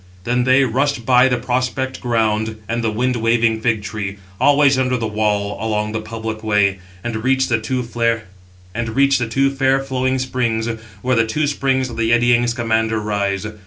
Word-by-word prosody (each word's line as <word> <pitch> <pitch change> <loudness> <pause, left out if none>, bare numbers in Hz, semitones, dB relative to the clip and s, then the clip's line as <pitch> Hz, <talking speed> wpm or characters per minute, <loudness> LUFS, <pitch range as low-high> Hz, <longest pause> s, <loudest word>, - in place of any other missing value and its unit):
Then 125 +2 0
they 130 +2 +5
rushed 130 0 0
by 125 +1 +5
the 125 -1 +1
prospect 130 +1 -2
ground 110 -2 0
and 115 +1 -2
the 115 - +1
wind 125 +3 0
waving 115 -1 +1
fig 110 -3 0
tree, 105 -2 -5 0.2
always 140 -2 +4
under 125 -1 +1
the 115 - -3
wall 105 -1 -1
along 105 -1 -1
the 110 0 -3
public 110 0 -6
way, 100 -3 +2 0.2
and 110 -2 -4
reached 130 0 +2
the 115 -2 +1
two 125 +3 -2
fair 115 -1 -1 1.6
flowing 130 -1 -1
springs, 125 -3 -1 0.4
where 130 0 +1
the 115 -1 +2
two 150 +7 0
springs 135 -3 0
of 115 - -8
the 115 0 +1
eddying 120 0 +3
Scamander 110 -2 0
rise. 100 -2 -2
115 Hz, 160 wpm, -19 LUFS, 110-130 Hz, 1.6 s, they